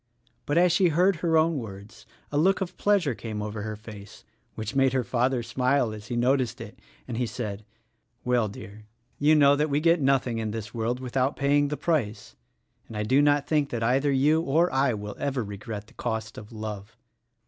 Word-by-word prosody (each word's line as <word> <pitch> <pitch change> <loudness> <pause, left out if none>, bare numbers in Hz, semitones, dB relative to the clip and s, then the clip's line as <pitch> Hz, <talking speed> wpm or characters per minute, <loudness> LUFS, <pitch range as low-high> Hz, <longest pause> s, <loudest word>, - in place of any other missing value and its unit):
But 145 - +1
as 175 0 +5
she 180 +2 +4
heard 180 +3 +3
her 165 -1 +2
own 160 -1 +2
words 100 -1 -10 0.2
a 145 - -1
look 190 +4 +3
of 185 -1 -4
pleasure 195 -9 +2
came 110 -2 -6
over 105 0 -4
her 110 +1 -4
face 105 -2 -12 0.2
— - - -43
which 110 +4 -5
made 135 -1 +3
her 130 -1 +1
father 125 +1 0
smile 125 +1 +1
as 105 -1 -9
he 120 - -3
noticed 125 0 +1
it - - -10
— - - -31
and 120 -3 -4
he 125 -1 0
said, 105 -3 -5 0.6
"Well, 125 -3 +2
dear, 105 +1 -11 0.3
you 150 +2 +5
know 145 -1 +6
that 150 +2 0
we 145 +1 +1
get 165 +1 +3
nothing 130 -4 +1
in 110 -1 -2
this 105 -1 -6
world 120 +2 -2
without 130 +1 -1
paying 145 +1 +2
the 150 +1 -3
price; 130 -11 -2 0.5
and 110 - -8
I 105 - -1
do 130 +6 +3
not 145 -1 +3
think 150 -2 +1
that 115 -1 -3
either 135 +5 +2
you 150 +4 +3
or 165 +1 +1
I 135 -3 +2
will 105 0 -6
ever 135 -3 -1
regret 105 +1 -7
the - - -21
cost 110 +1 -4
of 105 - -10
love. 110 0 -7
125 Hz, 210 wpm, -26 LUFS, 110-145 Hz, 0.6 s, know